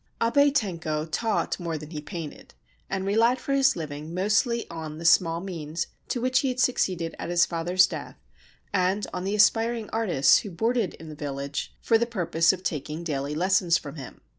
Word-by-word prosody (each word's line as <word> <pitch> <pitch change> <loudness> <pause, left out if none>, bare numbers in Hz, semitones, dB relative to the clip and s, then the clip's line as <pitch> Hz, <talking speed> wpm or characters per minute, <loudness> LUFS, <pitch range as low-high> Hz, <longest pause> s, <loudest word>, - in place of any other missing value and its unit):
Abe 285 +5 +4
Tenko 165 - -1
taught 220 +2 -1
more 170 -2 -3
than 150 +1 -10
he 150 -3 -5
painted, 165 -1 -8 0.3
and 190 0 -2
relied 230 +5 +3
for 275 - -3
his 270 -1 +4
living 155 0 -6
mostly 215 +5 +1
on 160 -2 -7
the 165 - -8
small 165 0 +4
means 165 -3 -4 0.2
to 245 - -2
which 255 +1 +2
he 275 - 0
had 255 -1 -2
succeeded 185 -9 +1
at - - -4
his 175 0 +4
father's 175 +2 +3
death - - -7 0.6
and 190 +2 +1
on 180 - -3
the 200 +2 0
aspiring 225 +2 +2
artists 175 -12 +4
who 215 - -7
boarded 225 +2 0
in 160 - -11
the - - -7
village 140 -1 -5
for 225 -1 +4
the 235 - +1
purpose 170 -7 +2
of 185 -1 -6
taking 150 +1 -3
daily 145 -2 -3
lessons 180 0 +3
from 145 -1 -9
him. 135 -4 -10
180 Hz, 190 wpm, -26 LUFS, 160-225 Hz, 0.6 s, Abe